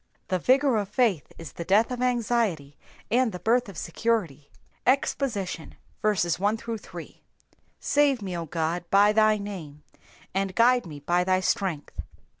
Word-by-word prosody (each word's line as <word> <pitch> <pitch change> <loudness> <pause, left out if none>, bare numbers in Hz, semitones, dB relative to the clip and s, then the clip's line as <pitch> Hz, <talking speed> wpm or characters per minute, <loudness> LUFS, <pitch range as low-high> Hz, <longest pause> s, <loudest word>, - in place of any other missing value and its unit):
The 185 - +1
vigour 265 - +3
of 205 -2 -2
faith 210 - +1
is 165 -5 -9
the 170 - -6
death 210 +7 +3
of 250 0 -4
anxiety, 230 - 0 0.4
and 245 0 +3
the 180 - -6
birth 235 +4 +1
of 190 - -10
security. 170 - -2 0.4
EXPOSITION. 235 - -1 2.0
SAVE 285 -4 +2
me, 185 -2 -4
O 170 -1 -4
God, 165 +2 -2
by 205 +1 +5
thy 215 0 +4
name, 170 -8 -8 0.5
and 195 0 -1
judge 245 0 +4
me 150 -4 -9
by 175 +4 +1
thy 185 0 +2
strength. 185 -6 -2
200 Hz, 135 wpm, -26 LUFS, 170-235 Hz, 2.0 s, by